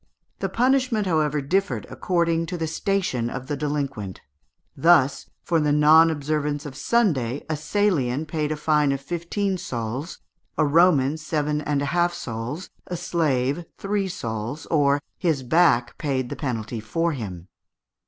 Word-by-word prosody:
The - - -1
punishment, 255 -3 +2
however, 155 -4 +1
differed 190 +8 0
according 170 -2 0
to 180 - -4
the 165 - -1
station 160 -8 -1
of 125 +1 -6
the 145 - -2
delinquent. 140 -10 -3 0.5
Thus, 145 -2 +3
for 170 -2 +1
the 150 -1 +2
non 155 +2 +6
observance 150 -1 -2
of 140 -3 -7
Sunday, 145 - +1
a 155 - -1
Salian 155 -5 0
paid 155 -1 -2
a - - 0
fine 150 -1 +2
of 135 - -3
fifteen 175 +6 -2
sols, 125 +6 -4 0.4
a - - +3
Roman 150 -2 +4
seven 150 -1 -1
and 145 -1 -1
a 140 +2 -2
half 175 0 +2
sols, 120 +9 -5 0.2
a 175 - -3
slave 145 -2 0
three 200 0 -1
sols, 115 - -4
or 145 -3 +3 0.2
"his 160 -7 0
back 130 -4 +3
paid 130 -5 -1
the - - -4
penalty 115 -4 -3
for 165 +11 -1
him." 95 - -6
150 Hz, 150 wpm, -24 LUFS, 135-170 Hz, 0.5 s, non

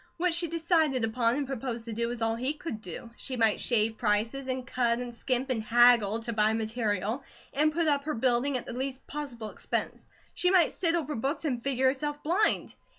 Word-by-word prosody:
What 355 0 +1
she 340 +1 +2
decided 320 -5 +1
upon 230 +1 +1
and 285 0 -1
proposed 245 -3 -4
to 230 - -5
do 235 +2 -1
was 235 -1 -3
all 225 0 +1
he 255 +5 -1
could 295 -8 -6
do. 200 +5 -8
She 260 -2 -5
might 225 -2 +3
shave 220 -2 +1
prices, 225 +5 0
and 255 -1 -3
cut, 240 -2 +1
and 245 -1 -5
skimp, 255 +2 -1
and 230 -3 0
haggle 230 -1 +5
to 235 0 -4
buy 215 0 +3
material, 220 +1 -1 0.3
and 305 +2 +3
put 330 +1 0
up 285 -1 +1
her 310 - -2
building 255 +3 +2
at 245 - -6
the - - -6
least 265 +1 -4
possible 250 -7 -6
expense. - - -3 0.3
She 360 - +2
might 360 -4 +4
sit 335 -2 +1
over 310 -3 -2
books 275 +8 -2
and 250 -5 -1
figure 265 -1 0
herself 290 +3 0
blind. 355 +8 +1
250 Hz, 210 wpm, -29 LUFS, 230-290 Hz, 0.3 s, haggle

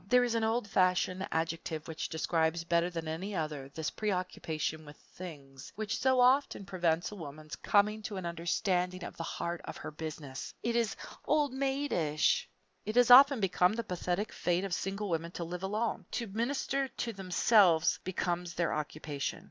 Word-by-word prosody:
There 250 +3 +5
is 240 -2 0
an 230 -1 +1
old 225 0 0
fashioned 185 0 +2
adjective 160 -1 -2
which 160 -1 -4
describes 160 0 0
better 170 +1 +2
than 165 -2 -5
any 185 +6 -4
other 150 -5 -3
this 155 +2 -4
preoccupation 180 -6 -2
with 150 0 -12
things, 140 -7 -11
which 215 0 -2
so 260 -1 +3
often 250 -4 +3
prevents 175 -2 0
a - - -7
woman's 155 -3 -8
coming 210 +1 +2
to 205 -1 -5
an 185 - -5
understanding 180 +2 -1
of - - -7
the 170 - -6
heart 170 +1 -3
of - - -7
her - - -7
Business. 150 -3 -7
It 235 0 0
is 235 -2 +1 0.3
old 295 -3 +2
maidish. 265 - +1 0.4
It 215 - -4
has 245 0 +5
often 275 +1 +9
been 180 +1 +3
the 235 - -2
pathetic 180 +1 -2
fate 175 +1 0
of 195 -2 -3
single 195 +3 -2
women 165 -2 -1
to 170 - -4
live 175 +1 -5
alone. 210 -1 -2
To 235 - -1
minister 265 +5 -1
to 235 -2 -4
themselves 185 -3 +4
becomes 175 -1 -2
their 170 -1 0
occupation. 150 -1 -3
180 Hz, 170 wpm, -32 LUFS, 160-215 Hz, 0.4 s, often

